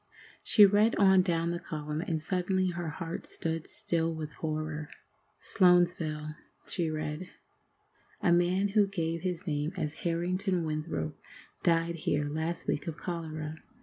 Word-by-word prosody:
She 210 - +7
read 210 +3 +4
on 190 -2 +6
down 170 -2 0
the 170 - -2
column, 150 -1 -4
and 170 -4 -1
suddenly 185 +3 0
her 175 -2 -4
heart 165 +2 -5
stood 165 -1 -3
still 165 -1 0
with 155 -2 -5
horror. 155 -1 -4 0.5
"SLOANSVILLE 175 -5 +2 0.3
[she 170 -3 -1
read]. 155 +3 -4 0.9
A 175 - +2
man 180 +3 +3
who 205 0 +4
gave 165 -4 -2
his 180 0 -3
name 150 -1 -1
as 155 -4 -2
Harrington 180 +2 0
Winthrop 155 - -3 0.4
died 170 0 +2
here 145 -2 0
last 160 +3 -3
week 145 - -1
of 165 -1 -4
cholera. 160 -3 -5
165 Hz, 140 wpm, -30 LUFS, 155-180 Hz, 0.9 s, She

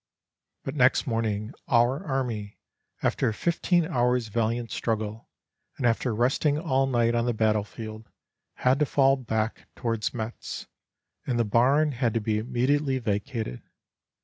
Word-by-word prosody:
"But - - -4
next 130 -1 +3
morning 110 -2 -1
our 125 +6 +3
army, 120 - -3 0.5
after - - +2
a - - -2
fifteen 170 +2 +1
hours' 125 -6 +1
valiant 115 +1 -1
struggle 110 -1 -3 0.5
and 130 - -2
after 115 0 +1
resting 135 +5 +2
all 135 -5 +1
night 120 -2 +2
on 120 0 +1
the 120 - 0
battlefield, 110 0 -2 0.5
had 130 +3 +2
to 150 - +2
fall 135 0 +4
back 110 -3 -2
towards 115 -3 -1
Metz, 115 -1 -5 0.6
and 125 - 0
the 115 - +2
barn 135 +8 +3
had 120 -3 -1
to - - +3
be 105 0 0
immediately 130 +4 +1
vacated. 110 - -3
120 Hz, 140 wpm, -27 LUFS, 110-135 Hz, 0.6 s, fall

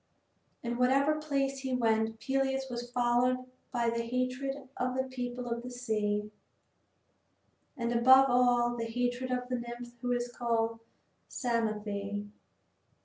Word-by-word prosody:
In 240 0 -2
whatever 275 +4 +3
place 275 -2 0
he 265 -1 -1
went 225 -2 +1
Peleus 270 +1 0
was 240 0 -4
followed 245 +1 +2 0.3
by 240 -2 +1
the 235 0 -1
hatred 255 +3 -1 0.2
of 250 0 -1
the 260 - +2
people 250 -1 -5
of 235 0 -2
the 250 - -7
sea, 210 -4 -1 1.5
and 235 -1 -1
above 260 +3 +7
all 245 -1 +4
by 230 -1 -2
the - - -6
hatred 245 +1 -1
of 250 0 -1
the 250 -1 -1
nymph 240 0 -7
who 245 - -1
is 240 0 -1
called 230 -1 0 0.5
Psamathe. 210 -4 -2
245 Hz, 140 wpm, -31 LUFS, 235-255 Hz, 1.5 s, above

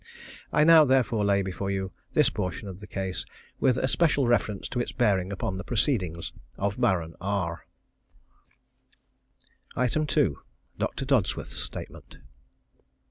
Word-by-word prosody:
I 150 - +4
now 165 0 +8
therefore 130 -5 +2
lay 100 -1 +3
before 95 +1 -4
you 95 -1 -2 0.2
this - - +5
portion 90 +3 -4
of 95 -1 -8
the 105 - -10
case 95 -4 -3 0.4
with 130 -1 +3
especial 140 +2 +2
reference 110 -4 +1
to 125 - -2
its 120 - -2
bearing 100 -6 +1
upon 95 -1 -3
the 95 - -5
proceedings 105 - -1 0.2
of 100 +4 -2
Baron 85 -9 +1
R. 90 -4 -2 2.1
2. 125 - +3 0.9
_Doctor 135 - -2
Dodsworth's 130 -8 0
Statement. - - -8
100 Hz, 125 wpm, -27 LUFS, 95-125 Hz, 2.1 s, now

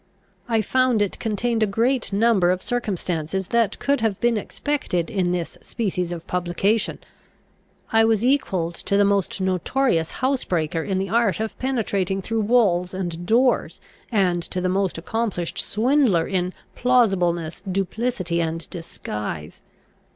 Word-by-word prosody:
I 225 -2 +2
found 255 +1 +2
it 200 - -4
contain 225 +1 -1
a 215 - +4
greater 230 +1 0
number 205 -4 +4
of 185 +1 0
circumstances 190 - -2
than 235 -3 +3
could 280 -3 0
have 220 -4 0
been 240 -1 +2
expected 215 - -2
in 185 -5 +1
this 175 -2 -3
species 180 -6 -2
of 170 -1 -6
publication, 180 +5 0 0.9
I 225 0 +5
was 225 0 +2
equalled 190 -11 +1
to 200 - -1
the 205 - +5
most 200 -1 +1
notorious 185 0 +1
housebreaker 180 - 0
in 190 +2 -2
the 190 0 -2
art 225 -2 +2
of 220 0 -3
penetrating 200 -7 0
through 225 +3 -1
walls 195 -6 +2
and 175 -2 -4
doors, 245 +4 +2 0.3
and 185 -5 +2
to 180 +2 -4
the 180 - 0
most 190 -1 0
accomplished 185 -1 -2
swindler 225 - +2
in 185 -1 -1 0.2
plausibleness, 180 -10 +2
duplicity, 190 -1 -1
and 165 0 -3
disguise. 105 - -6
195 Hz, 140 wpm, -23 LUFS, 175-230 Hz, 0.9 s, I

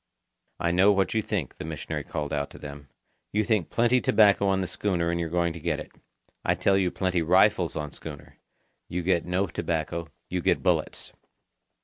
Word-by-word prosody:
"I 85 - +1
know 95 +4 +5
what 95 -1 +1
you 110 - +2
think," 100 -10 -3
the - - -4
missionary 80 -1 -4
called 75 -1 -4
out 70 -1 -1
to - - -12
them. 70 -1 -9 0.4
"You 105 +1 +1
think 105 -5 0
plenty 120 +2 +3
tobacco 100 -2 +4
on 95 0 +2
the - - -1
schooner 85 -4 -1
and 85 - -1
you're 85 -1 -2
going 85 0 0
to 85 - -8
get - - -1
it. - - -9 0.5
I - - +2
tell 95 - +2
you 95 -2 +2
plenty 90 -1 0
rifles 90 +2 +3
on 75 -2 -4
schooner. 75 -3 -10 0.5
You 90 0 -2 0.2
no 90 +3 0
get 90 - -12
tobacco, 85 0 -2 0.2
you 90 0 -2
get - - +1
bullets." - - 0
90 Hz, 195 wpm, -27 LUFS, 80-100 Hz, 0.5 s, know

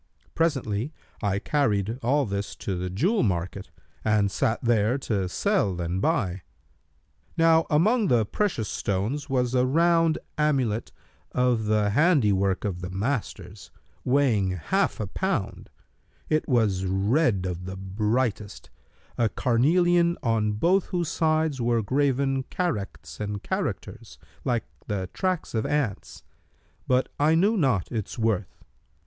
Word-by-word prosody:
Presently 135 -6 0 0.3
I 100 -2 0
carried 110 -3 0
all 140 +4 +2
this 100 -1 -4
to 95 - -4
the 90 +1 -3
jewel 175 - +1
market 90 -3 -2 0.3
and 105 -2 +2
sat 110 +4 0
there 115 +1 +2
to 100 -8 -2
sell 100 - 0
and 85 +2 -2
buy. 100 - 0 1.0
Now 165 0 +4
among 210 +9 +3
the 120 -6 +3
precious 120 - -1
stones 110 +13 -2
was 125 -2 0
a 125 -1 +3
round 165 +2 +3 0.2
amulet 130 -8 0 0.4
of 125 -3 +1
the 105 -1 +2
handi 145 - +4
work 95 0 0
of 90 -3 -3
the 90 - -5
masters,[FN#290] 100 -2 -4 0.2
weighing 125 -8 +2
half 90 -5 0
a - - -1
pound: - - -3 0.6
it 155 0 0
was 110 -7 +2
red 100 - +1
of 90 0 -4
the 95 +1 -6
brightest, 105 +2 -2 0.5
a 115 -2 +3
carnelian 170 - +2
on 110 -3 +1
both 175 - +2
whose 175 -3 -2
sides 155 -4 +1
were 115 -1 +1
graven 135 +2 +1
characts 165 - -4
and 105 -1 -4
characters, - - -4 0.3
like 120 -3 0 0.2
the 95 -4 -3
tracks 185 -3 -2
of 110 -1 0
ants; 140 -10 -2 0.6
but 130 0 +2
I 155 +2 +4
knew 200 +7 +3
not 130 - +1
its 110 0 -4
worth. 110 -4 -1
115 Hz, 130 wpm, -26 LUFS, 100-150 Hz, 1.0 s, Now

